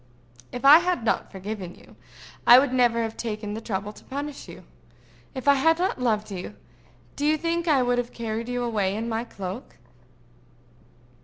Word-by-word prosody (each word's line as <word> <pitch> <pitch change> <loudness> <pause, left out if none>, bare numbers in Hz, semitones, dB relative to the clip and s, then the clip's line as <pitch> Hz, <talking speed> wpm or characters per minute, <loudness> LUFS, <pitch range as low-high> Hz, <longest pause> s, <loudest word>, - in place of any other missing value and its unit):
"If 245 +2 -6
I 295 +4 +10
had 355 -7 -1
not - - 0
forgiven 195 -2 -6
you, - - -18 0.5
I 240 - +10
would 260 0 +3
never 240 -2 +3
have 225 0 -4
taken 215 -2 -4
the 220 - -5
trouble 205 -1 -4
to - - -16
punish 285 +1 -6
you. - - -11 0.7
If 260 +1 -6
I 280 - +8
had 325 +4 +3
not 355 -7 -1
loved 215 -3 0
you, 180 - -6 0.6
do - - -5
you 305 +1 +3
think 335 +2 -2
I 280 -5 +4
would 245 0 +1
have 245 -1 -3
carried 230 0 -4
you 245 0 -2
away 205 -5 -1
in 225 +2 -3
my 225 0 -2
cloak?" 200 0 -8
235 Hz, 180 wpm, -25 LUFS, 215-275 Hz, 0.7 s, I